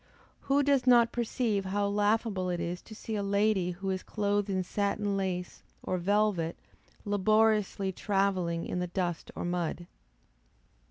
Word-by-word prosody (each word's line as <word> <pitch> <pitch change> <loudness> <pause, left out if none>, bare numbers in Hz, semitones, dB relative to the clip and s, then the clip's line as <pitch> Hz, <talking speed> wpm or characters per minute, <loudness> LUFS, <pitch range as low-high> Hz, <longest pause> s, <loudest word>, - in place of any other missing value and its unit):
Who 280 +1 +4
does 275 -2 +2
not 235 -2 +6
perceive 225 -4 -1
how 200 +2 0
laughable 205 -2 +1
it 175 -1 -1
is 175 +1 -3
to 220 - -12
see 220 - -6
a 205 - -1
lady 200 -2 +1
who 190 +2 -3
is 185 0 -2
clothed 205 -1 -1
in 190 -1 0
satin 200 +1 -1
lace, 185 -2 -3 0.2
or 185 - -1
velvet, 195 -3 +1 0.5
laboriously 210 -1 +2
travelling 190 -4 0
in 180 - -3
the 180 - -1
dust 175 -2 -3
or - - -4
mud. 175 -1 -2
200 Hz, 150 wpm, -30 LUFS, 180-215 Hz, 0.5 s, not